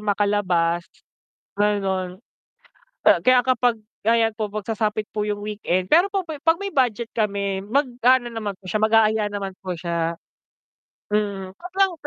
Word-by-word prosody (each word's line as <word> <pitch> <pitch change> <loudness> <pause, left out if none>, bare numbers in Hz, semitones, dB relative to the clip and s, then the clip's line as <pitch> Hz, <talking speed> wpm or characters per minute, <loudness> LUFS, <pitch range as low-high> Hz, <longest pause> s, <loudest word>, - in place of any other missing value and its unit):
makalabas 195 -5 +1 0.7
ganon. 190 -3 0 0.9
Ah, - - +6
kaya 255 0 +5
kapag 245 -2 +2 0.3
ayan 225 -1 +3
po 215 -1 -3
'pag 210 -1 -5
sasapit 215 -1 -1
po 210 - -1
yung 205 -1 -3
weekend, 195 -3 -1
pero 345 +5 +6
po 390 -1 -1
pay 315 -3 -6
'pag 325 +2 +4
may 400 +1 -5
budget 240 -3 0
kami 200 -3 -1
mag-aano 250 -1 +2
naman 210 -3 -4
po 190 - -25
siya 215 +4 -1
mag-aaya 220 0 +4
naman 200 -2 -4
po 185 -2 -4
siya, 170 -1 -2 1.0
mm, 200 -3 -1
sobrang 375 - 0
210 Hz, 145 wpm, -23 LUFS, 195-240 Hz, 1.0 s, Ah